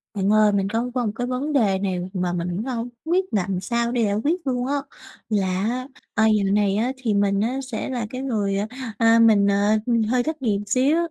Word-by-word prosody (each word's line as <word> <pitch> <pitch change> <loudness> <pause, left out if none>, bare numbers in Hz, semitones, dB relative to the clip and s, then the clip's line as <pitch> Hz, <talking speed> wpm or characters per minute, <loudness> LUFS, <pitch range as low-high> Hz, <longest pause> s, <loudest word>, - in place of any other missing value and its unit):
Bạn 195 0 0
ơi, 215 -1 +5
mình 195 -1 0
có 230 +3 -1
có 250 -2 0
một 210 - -1
cái 245 +1 -3
vấn 260 +4 -2
đề 205 -8 +2
này 190 -2 -1
mà 180 -2 -1
mình 175 0 -2
cũng 180 +5 -3
hông 245 -2 -3 0.2
biết 360 +3 +1
làm 195 -2 0
sao 235 +4 -1
để 245 -1 0
giải 200 -1 +1
quyết 340 +5 0
luôn 250 -1 -1
á. 285 - 0 0.5
Là, 205 -3 +1 0.7
à, 220 - +4
dạo 210 -2 +3
này 205 -1 +2
á 235 +5 0
thì 240 -5 -1
mình 200 -1 +2
á 245 +5 -1
sẽ 220 - -3
là 245 -3 -2
cái 255 +2 -5
người, 210 -7 -1
à, 205 +2 -1 0.3
à 230 0 +5
mình, 215 -3 +5
ờ, 205 +2 +3 0.3
hơi 250 0 +2
thất 315 0 -4
nghiệp 210 -6 +1
xíu, 260 +9 +2
220 Hz, 225 wpm, -23 LUFS, 200-250 Hz, 0.7 s, ơi